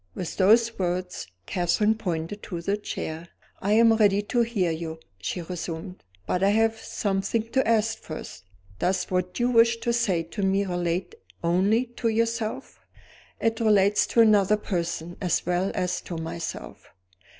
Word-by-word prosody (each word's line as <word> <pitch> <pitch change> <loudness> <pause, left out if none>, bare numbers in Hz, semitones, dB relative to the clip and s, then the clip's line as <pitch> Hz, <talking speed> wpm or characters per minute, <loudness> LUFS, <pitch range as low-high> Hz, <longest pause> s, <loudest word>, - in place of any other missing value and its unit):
With 175 - -5
those 225 +4 +4
words, 180 - -2 0.2
Catherine 185 +4 +2
pointed 185 -2 -4
to 175 -4 -5
the 195 +4 0
chair. 165 -5 -5 0.3
"I 205 +2 +1
am 230 +1 +6
ready 205 -2 +3
to 240 +3 +1
hear 210 -7 +1
you," 160 0 -5 0.2
she 170 - -3
resumed 175 +1 -6 0.2
"but 180 - -1
I 195 - +4
have 225 +1 +2
something 200 +3 -1
to 265 -3 +2
ask 225 0 +2
first. 100 - -9 0.3
Does 185 +1 +1
what 180 +2 -1
you 245 +1 +2
wish 230 -1 +5
to 235 - 0
say 200 -8 +1
to 170 +5 -6
me 195 +1 +2
relate 175 - -2 0.3
only 195 +8 +2
to 235 - 0
yourself?" 230 0 -1 0.6
"It 225 0 0
relates 205 -2 +4
to 235 - +4
another 210 -2 +5
person, 170 -3 -3
as 180 -4 0
well 180 +2 0
as 180 -1 -1
to 170 - -5
myself." 165 0 -6
195 Hz, 155 wpm, -26 LUFS, 175-225 Hz, 0.6 s, am